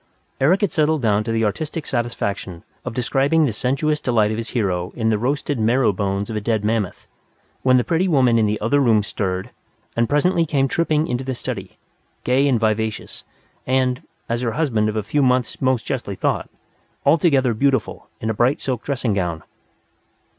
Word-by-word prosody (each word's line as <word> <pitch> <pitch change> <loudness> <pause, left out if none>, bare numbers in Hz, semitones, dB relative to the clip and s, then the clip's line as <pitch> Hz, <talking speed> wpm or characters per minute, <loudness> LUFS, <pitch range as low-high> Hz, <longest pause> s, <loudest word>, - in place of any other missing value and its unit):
Eric 170 +10 +3
had 205 -6 +1
settled 155 -2 +1
down 105 -1 +2
to 115 - -2
the 115 0 +1
artistic 150 +9 -3
satisfaction 100 - -3 0.2
of 125 -3 -6
describing 140 +5 +2
the 120 - -1
sensuous 140 +7 0
delight 110 -4 +2
of 110 - -2
his 115 0 -4
hero 90 -7 -1
in 110 -2 0
the 110 - +2
roasted 140 +2 -1
marrow 115 0 +3
bones 100 +1 -2
of 110 - -5
a 105 - -2
dead 110 -1 0
mammoth, 110 -3 -1 0.6
when 130 -1 +4
the 125 - +2
pretty 170 +6 +1
woman 130 -8 +3
in 110 - +3
the 105 +1 -1
other 115 +7 +2
room 115 -6 +3
stirred, 95 +2 -3 0.4
and 115 0 +1
presently 170 +4 +2
came 140 -4 +1
tripping 155 +1 +1
into 125 -3 -2
the 130 -1 -3
study, - - -6 0.5
gay 130 +3 +2
and 125 -4 +2
vivacious, 110 0 -2 0.4
and 130 -1 +1 0.3
as 120 +1 -1
her 115 -3 -1
husband 115 -7 +1
of 105 - -4
a 110 - -1
few 145 +8 0
months 125 -2 +1
most 130 -3 +1
justly - - -3
thought - - -1 0.6
altogether 140 -4 +3
beautiful 135 +4 0
in 110 - -4
a - - -1
bright 120 +6 +2
silk 125 -4 -2
dressing 130 -6 -1
gown. 85 -4 -2
125 Hz, 185 wpm, -21 LUFS, 110-140 Hz, 0.6 s, when